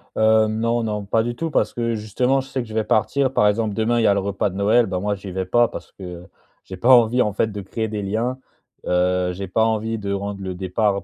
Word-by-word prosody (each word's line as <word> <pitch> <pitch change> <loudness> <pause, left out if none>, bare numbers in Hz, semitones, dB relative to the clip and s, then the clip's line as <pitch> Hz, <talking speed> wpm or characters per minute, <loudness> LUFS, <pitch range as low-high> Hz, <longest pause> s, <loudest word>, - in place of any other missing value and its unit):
Heu, 110 0 +4
non, 115 +2 0
non, 105 -2 -3
pas 110 +3 +1
du 120 +1 -3
tout, 165 +5 -3
parce - - +1
que, 115 -1 -1
justement, 125 +5 0
je 130 - -12
sais 130 - -2
que 120 - -8
je - - -8
vais 110 0 +1
partir. 130 +5 +1
Par 105 - +4
exemple, 105 0 0
demain, 115 +2 +1
il - - +1
y - - +4
a 100 - +5
le 100 - +1
repas 100 +1 -1
de 95 - -10
Noël, 105 +4 +3
bah, 95 -3 -3
moi, 100 +2 -1
j'y 95 -1 -9
vais 95 +1 -3
pas 120 +5 +3
parce - - -9
que, 95 - -13
heu, 90 0 -8 0.4
j'ai 95 - -9
pas 120 +8 +1
envie, 120 0 +5
en 105 -4 0
fait, 110 - +1
de 100 0 -6
créer 110 +3 -3
des 105 -1 -4
liens. 115 +6 -2 0.5
Heu, 90 0 +1
j'ai 95 +2 -6
pas 110 +5 +1
envie 110 0 -1
de 100 -2 -4
rendre 100 0 -4
le 95 -1 -4
départ 100 +2 0
105 Hz, 270 wpm, -21 LUFS, 100-115 Hz, 0.5 s, a